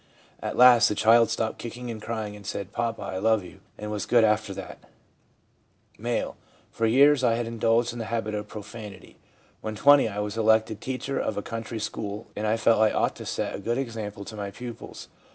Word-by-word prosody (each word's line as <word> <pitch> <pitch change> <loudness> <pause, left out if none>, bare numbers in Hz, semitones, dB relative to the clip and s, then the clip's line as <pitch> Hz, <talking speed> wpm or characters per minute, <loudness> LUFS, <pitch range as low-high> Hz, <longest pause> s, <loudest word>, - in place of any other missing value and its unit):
At - - -4
last 125 -2 +8
the 105 - -1
child 115 +2 +5
stopped 110 -1 -2
kicking 120 +1 -6
and 110 -2 -7
crying 110 -2 -4
and 105 - -12
said, 100 0 -5
"Papa, 115 0 -2
I 95 - -4
.love 110 0 +2
you," 90 - -13 0.2
and 105 0 -6
was 105 -3 -3
good 120 -2 +5
after 110 -1 +2
that/ 95 - -8 1.2
M. - - 0
1 - - -9 0.4
For 115 - 0
years 135 +3 +5
I 115 -2 +3
had 120 0 -2
indulged 115 +1 +1
in 120 - -7
the 115 - -3
habit 110 -2 -2
of 105 0 -4
profanity. 105 -1 -10 0.4
When 110 0 -4
20, 140 +3 +6
I 100 - -7
was 105 +1 -3
elected 110 -1 +2
teacher 130 +1 -3
of 110 - -2
a 100 - -2
country 115 0 -5
school, 105 0 -4
and 105 +1 -2
I 110 +1 +2
felt 115 0 +3
I 110 - +6
ought - - 0
to - - -8
set - - -2
a - - -5
good 120 +1 -1
example 110 -6 -5
to 110 - -8
my 100 -1 -4
pupils. 120 +3 -9
110 Hz, 210 wpm, -26 LUFS, 105-115 Hz, 1.2 s, last